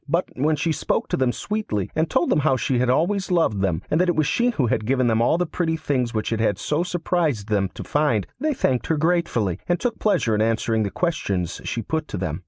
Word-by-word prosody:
But 170 +4 +1
when 150 +4 +1
she 160 +3 -1
spoke - - -1
to - - +1
them 130 -2 +2
sweetly, 165 - -3
and 160 +1 +1
told 175 - +1
them - - +3
how 135 -3 +2
she 125 0 0
had 125 0 +1
always 190 +9 +1
loved 160 - +2
them, 90 -5 0
and 160 - +3
that 180 - +2
it 175 - +1
was 155 - +2
she 240 - +2
who 150 - 0
had 110 -2 -1
given 130 0 +2
them 115 -1 +2
all 120 +7 +3
the 180 - +1
pretty 160 -1 -1
things 130 -6 -1
which 110 +1 -2
it 110 - -1
had 105 -3 +1
so 150 +2 -1
surprised 165 - -1
them 100 -3 +1
to - - -6
find, 145 -9 +1
they 305 -1 0
thanked 130 - 0
her 160 - +1
gratefully, 150 - 0
and 175 - +2
took 240 -2 -2
pleasure 165 - +2
in 105 - +1
answering 115 0 +1
the 105 - 0
questions 100 - -2
she - - -3
put - - -2
to - - -5
them. - - -3
145 Hz, 250 wpm, -23 LUFS, 110-170 Hz, -, them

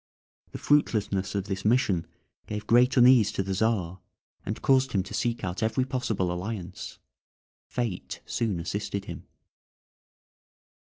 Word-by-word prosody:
The - - -6
fruitlessness 105 -9 +1
of 100 - 0
this 95 -1 -4
mission 105 -7 +2 0.4
gave 105 0 -5
great 125 +4 +4
uneasiness 125 -3 +6
to 95 - -1
the 95 0 -3
Czar, 95 -4 0 0.4
and - - -4
caused 135 -1 +3
him 95 -3 +2
to 95 - -10
seek 120 -2 -1
out 90 -1 -3
every 115 +4 +1
possible 110 -9 -1
alliance. 90 +1 -5 0.7
Fate 115 -7 -4
soon 110 -7 -1
assisted 100 +3 -3
him. - - -8
105 Hz, 130 wpm, -27 LUFS, 95-120 Hz, 0.7 s, uneasiness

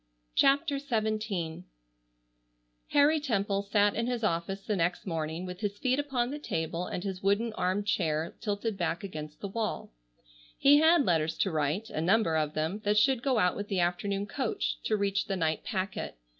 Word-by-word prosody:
CHAPTER 280 +1 +3
XVII 215 - -2 1.2
Harry 295 +2 +4
Temple 200 -8 0
sat 205 0 +2
in 230 +1 -1
his 245 -2 -2
office 195 +1 -1
the 210 - -1
next 175 -1 0
morning 165 0 -3
with 180 0 -7
his 205 -1 -3
feet 255 +4 +1
upon 260 -4 -1
the 295 - -5
table 165 - -3
and 180 - -4
his 190 -2 -4
wooden 205 +4 +1
armed 190 +1 0
chair 160 -6 0
tilted 205 -1 -2
back 170 +1 -1
against 155 -5 -7
the 200 - -3
wall. 215 +2 -3 0.7
He 290 +1 +6
had 320 -2 +5
letters 160 -2 +1
to 190 - +1
write, 155 +8 -1
a 155 - -2
number 180 -1 +3
of 155 -1 0
them, 160 +7 -1
that 210 +1 +2
should 255 +2 +4
go 260 -2 +1
out 180 -4 +3
with 205 0 -4
the 195 -3 -1
afternoon 195 +3 0
coach, 240 +3 -2
to 215 - +2
reach 200 -1 0
the 195 - -1
night 160 -3 0
packet. 190 - -3
200 Hz, 180 wpm, -29 LUFS, 175-230 Hz, 1.2 s, He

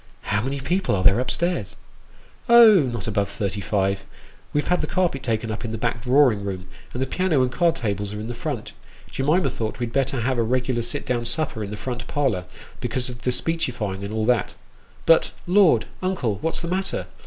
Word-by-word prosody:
" - - -33
How 105 - +2
many 135 +4 -3
people 175 - 0
are 95 - -1
there 100 +4 +6
up 130 - -3
stairs? 170 - 0 0.2
" - - -27
" - - -29
Oh, 220 - +8
not 115 -5 -5
above 100 -2 0
thirty 100 0 -3
five. 95 -1 0 0.5
We've 145 - 0
had 180 - +2
the 155 - -2
carpet 175 -7 0
taken 115 -3 -1
up 110 - -5
in 115 - -4
the 115 - -3
back 115 0 -1
drawing 125 -4 +4
room, 95 -2 -4 0.3
and 125 - -5
the 130 - +1
piano 165 -2 +1
and 125 - 0
the - - -11
card 170 -2 +3
tables 105 -4 -2
are 105 - -5
in 110 - -5
the 120 - -4
front. - - -4 0.4
Jemima 155 +7 +1
thought 110 -1 -4
we'd 120 -2 -4
better 135 -2 0
have 125 +1 0
a - - +4
regular 125 +1 0
sit 115 - -5
down 120 -1 -1
supper 120 -3 -2
in 100 - -5
the 105 - -6
front 125 +2 -5
parlour, 130 -12 0 0.3
because 125 0 -2
of 120 -1 -9
the 125 - 0
speechifying, 120 -10 -2
and 100 - -5
all 110 0 -1
that. 120 -3 +1 0.5
But, 165 - +5 0.2
Lord! 175 - +4 0.2
uncle, 145 - -1
what's 165 - -2
the 170 - -4
matter 190 +2 -2
125 Hz, 220 wpm, -23 LUFS, 110-150 Hz, 0.5 s, Oh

